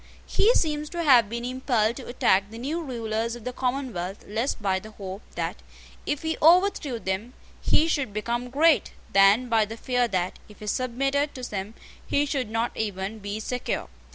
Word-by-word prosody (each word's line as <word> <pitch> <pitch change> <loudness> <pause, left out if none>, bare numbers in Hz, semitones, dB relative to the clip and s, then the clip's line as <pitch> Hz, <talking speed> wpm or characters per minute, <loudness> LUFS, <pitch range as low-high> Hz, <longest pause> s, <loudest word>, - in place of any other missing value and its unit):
He 440 - +4
seems 300 -2 0
to 340 0 -3
have 245 -8 +6
been 235 +1 -4
impelled 245 -3 +1
to 265 - -8
attack 200 -5 +2
the 225 - -9
new 295 +8 -2
rulers 230 -4 -2
of 240 - -10
the 250 - -4
Commonwealth 245 -8 -3
less 225 +6 -1
by 190 -3 0
the 215 - -11
hope 195 -1 -7
that, - - -2 0.5
if 295 0 -1
he 320 0 -1
overthrew 335 -6 +4
them, 210 +4 -3 0.3
he 315 - +3
should 280 -8 0
become 235 +4 -2
great, 310 +4 +3 0.2
than 195 +5 +6
by 225 -2 +3
the 225 +2 -8
fear 245 0 +1
that, 185 -4 -2
if 210 - -14
he 215 - -8
submitted 275 +6 0
to 255 - -7
them, 205 +2 -5 0.3
he 285 - +1
should 270 -6 -2
not 225 +2 -1
even 205 0 -3
be 205 +1 -4
secure. 250 +3 -3
235 Hz, 180 wpm, -26 LUFS, 210-275 Hz, 0.5 s, have